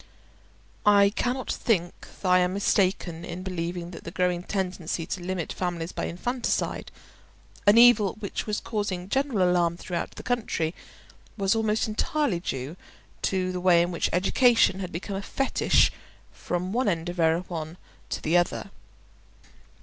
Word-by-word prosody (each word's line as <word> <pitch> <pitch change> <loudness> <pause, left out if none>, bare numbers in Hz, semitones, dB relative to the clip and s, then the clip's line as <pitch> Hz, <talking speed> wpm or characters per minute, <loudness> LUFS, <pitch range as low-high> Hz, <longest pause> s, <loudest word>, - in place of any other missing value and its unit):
I 200 -1 +6
cannot 250 +1 -1
think 175 -7 -1 0.2
I 185 -1 +5
am 180 +1 +1
mistaken 185 -4 +1
in 175 +1 -6
believing 175 -1 -4
that - - -10
the - - -6
growing 180 0 0
tendency 180 -3 -3
to 180 - -4
limit 180 -2 -3
families 175 -2 -3
by - - -3
infanticide—an 230 0 -2
evil 235 -5 +7
which 205 0 -4
was 210 -1 -1
causing 205 -5 -3
general 260 -9 +1
alarm 170 -1 +2
throughout 175 -1 -4
the - - -9
country—was 195 -2 -3
almost 220 -1 +1
entirely 220 - 0
due 140 -1 -4 0.4
to 185 -1 0
the 180 -1 -4
way 175 -2 +5
in 175 - -2
which 170 - 0
education 195 +2 +4
had 185 -2 -5
become 175 +4 -5
a - - -3
fetish 270 +6 +2 0.4
from 180 +2 -3
one 250 +1 +1
end 165 -2 -2
of 175 0 -5
Erewhon 165 0 0 0.3
to - - -4
the 160 +3 +1
other. 175 +2 +1
185 Hz, 140 wpm, -26 LUFS, 175-205 Hz, 0.4 s, evil